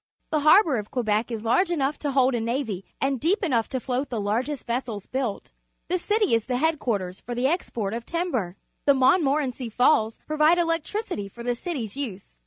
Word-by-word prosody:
The 310 - +2
harbour 310 - +5
of 210 -1 -5
Quebec 220 -2 0
is 225 -2 -5
l 225 - +1
arge 365 +6 +3
enough 295 -4 0
to 290 - -2
ho 265 -2 +5
ld 260 - +2
a - - +1
n 225 +1 -3
avy 230 -7 -2 0.2
and 270 -1 0
deep 370 - +1
enough 240 -10 +1
to 260 - -2
float 260 +2 -2
the 235 - -2
largest 240 +8 -2
vessels 235 -4 -3
built. 255 -6 -3 0.4
The 365 +1 +1
city 420 - +1
is 230 -1 +1
the 250 -1 0
head 320 +2 +1
quarters 190 -6 -2
for 240 - -6
the 245 +2 0
export 240 - -1
of 230 0 -4
timber. 255 - -2 0.3
The 280 - +5
Montmorenc 275 -1 +2
y 245 -3 -4
Falls 225 -1 +3
provide 310 +2 +3
electricity 330 - -1
for 235 +4 -10
the 245 0 0
city's 250 - -5
use. 200 - -6
255 Hz, 210 wpm, -25 LUFS, 225-305 Hz, 0.4 s, harbour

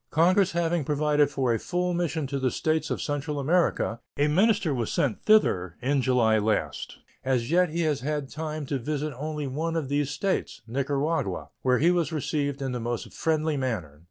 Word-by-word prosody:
Congress 185 +4 +3
having 170 -1 +1
provided 150 0 +2
for 130 -4 0
a 115 - 0
full 180 0 -1
mission 165 -3 -1
to 140 +1 -3
the 130 -1 +1
States 155 +3 0
of - - -2
Central 145 0 -2
America, 150 -6 +1 0.2
a 145 +1 +3
minister 190 +1 +3
was 120 -4 -2
sent 130 -7 0
thither 90 - +3
in 140 +2 +1
July 120 -4 +3
last. 105 +1 -1 0.3
As 130 -1 0
yet 180 0 +4
he 170 +2 -2
has 155 -4 0
had 145 0 -2
time 155 0 -5
to 135 0 -2
visit 150 +3 -3
only 150 +2 -4
one 160 +5 -2
of 155 -5 -2
these 145 0 0
States 145 - -2
(Nicaragua), 140 +6 -1
where 125 -1 +3
he 170 +4 +4
was 170 -5 +1
received 145 -2 -2
in 135 - -2
the 125 - -3
most 120 0 -4
friendly 155 -1 0
manner. 100 - -3
145 Hz, 185 wpm, -27 LUFS, 130-160 Hz, 0.3 s, yet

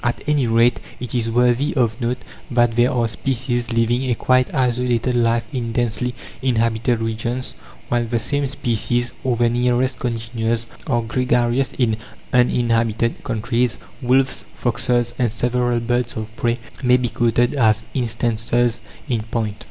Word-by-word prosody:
At 120 -1 -1
any 145 -4 +2
rate 115 +2 +3 0.2
it 125 -2 -6
is 115 -2 0
worthy 125 +4 +2
of 120 -2 +1
note 120 +1 0 0.3
that 120 -2 +2
there 120 +2 +4
are 120 -2 +1
species 120 +1 -2
living 120 +3 +1
a 120 - +2
quite 130 +2 +2
isolated 125 -1 +1
life 115 -1 +2
in 120 -3 -2
densely 120 +1 -1 0.3
inhabited 115 -2 +1
regions, 115 +3 -2 0.3
while 120 -1 +1
the 120 +1 -1
same 140 +5 0
species, 120 -2 -1
or 130 -2 +1
their 120 0 +3
nearest 125 +1 +1
congeners, 115 -1 -2 0.2
are 120 -5 +1
gregarious 125 +2 +1
in 115 -4 +1 0.4
uninhabited 115 -2 +2
countries. 115 +2 0 0.2
Wolves, 130 +1 +2
foxes, 120 0 0
and 120 -3 +2
several 120 +1 +1
birds 120 +1 -1
of 110 0 -6
prey 120 0 0 0.2
may 125 -1 +5
be 125 -1 -1
quoted 120 +1 +2
as 110 -5 +3
instances 120 -1 0 0.3
in 120 -5 0
point. 110 -1 -3
120 Hz, 145 wpm, -21 LUFS, 115-125 Hz, 0.4 s, may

